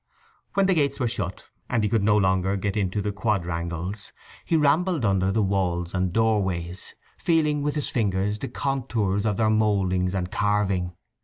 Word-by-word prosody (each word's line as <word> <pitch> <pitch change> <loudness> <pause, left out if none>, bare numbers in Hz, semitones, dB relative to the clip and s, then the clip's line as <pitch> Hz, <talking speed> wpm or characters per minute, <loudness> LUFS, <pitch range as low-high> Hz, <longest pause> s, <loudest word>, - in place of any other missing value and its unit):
When 195 -1 +4
the 190 - +3
gates 145 -4 +1
were 125 - +1
shut, 100 -6 -4 0.2
and 120 -3 +1
he - - +2
could 115 - +2
no 105 +1 +4
longer 95 0 +2
get 100 0 -2
into 100 0 -1
the 105 - -1
quadrangles, 90 -2 -2 0.3
he 165 - +1
rambled 155 0 +2
under 95 -1 +2
the 110 +1 +2
walls 90 -3 -1
and 90 -1 0
doorways, 95 -5 -1 0.2
feeling 155 -3 +2
with 145 +1 -1
his 150 - -1
fingers 105 -2 0
the - - -4
contours 115 -7 -1
of 105 -2 0
their 110 -1 +3
mouldings 95 -4 +1
and 90 -1 -2
carving. 100 -4 0
100 Hz, 170 wpm, -25 LUFS, 95-115 Hz, 0.3 s, When